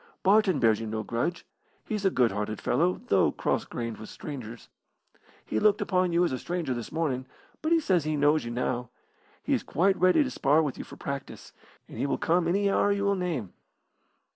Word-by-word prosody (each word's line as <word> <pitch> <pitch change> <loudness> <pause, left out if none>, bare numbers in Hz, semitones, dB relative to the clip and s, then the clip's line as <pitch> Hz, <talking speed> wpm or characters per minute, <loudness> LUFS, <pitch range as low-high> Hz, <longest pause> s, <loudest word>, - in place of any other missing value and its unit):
Barton 195 -3 +4
bears 110 -2 +3
you 115 - -5
no 110 0 -3
grudge. 145 +9 -2 0.4
He's 210 -3 -3
a - - +6
good 125 -9 +2
hearted 105 +1 -3
fellow, 175 +8 +1
though 95 -2 +4
cross - - -1
grained 115 -2 -5
with 110 - -10
strangers. 120 -6 -8 0.8
He 110 - -1
looked 210 -1 +4
upon 185 -2 +1
you 170 +1 +3
as - - -1
a 130 - -2
stranger 170 -6 -2
this 120 -2 -6
morning, 135 -5 -2 0.3
but 315 - -1
he 335 - +5
says 185 - +1
he 155 0 -1
knows 145 +2 +3
you 120 - -5
now. 125 0 -2 0.5
He - - 0
is - - +1
quite 190 +3 +1
ready 185 +11 +5
to 265 - -4
spar 150 +4 +3
with 145 -4 -3
you - - -4
for - - -12
practice, 140 -1 -6 0.3
and - - -10
he - - 0
will - - 0
come 170 +1 +1
any 200 +4 +2
hour 200 +1 +2
you 200 0 0
will 200 0 +2
name." 165 - -3
155 Hz, 210 wpm, -28 LUFS, 120-185 Hz, 0.8 s, a